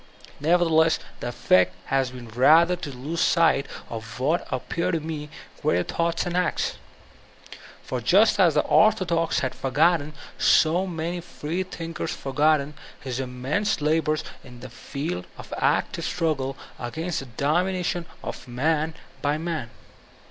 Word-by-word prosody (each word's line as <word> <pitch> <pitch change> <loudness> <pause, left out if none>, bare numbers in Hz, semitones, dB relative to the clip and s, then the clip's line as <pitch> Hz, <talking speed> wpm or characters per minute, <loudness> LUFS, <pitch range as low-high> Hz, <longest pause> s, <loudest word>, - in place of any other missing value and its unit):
Nevertheless 160 0 +3 0.2
the - - -4
effect 90 -6 +3
has 135 -2 +2
been 125 -1 -10
rather 160 +9 +5
to 175 -4 -7
k)se 140 +6 -5
sight 165 -6 +3 0.2
of 115 0 -7
what 155 +7 +1
appear 135 +7 -2
to 165 -2 +1
me 155 -1 -5 0.3
greater 155 - +2
thoughts 170 0 -1
and 175 0 -3
acts. 180 0 0 1.0
For - - -3
just - - +4
as - - +5
the - - +5
orthodox 180 -6 +3
have 130 - -1
forgotten, 155 +3 +2 0.3
so 175 +4 +4
have - - -4
many 170 +1 -3
freethinkers 165 0 -4
foigotten, 145 +1 +1 0.3
his 130 -2 -4
immense 135 +12 -1
labors 155 +1 +1 0.2
in 125 -2 -13
the 130 -2 -9
field 115 - -5
of - - -9
active - - +1
strug 165 -4 0
gle 135 0 -4 0.2
against 160 +8 -3
the 135 - -8
domination 175 +7 0 0.2
of - - -7
man 155 +6 0 0.3
by 145 +1 +1
man. 160 -7 -3
155 Hz, 140 wpm, -25 LUFS, 130-170 Hz, 1.0 s, rather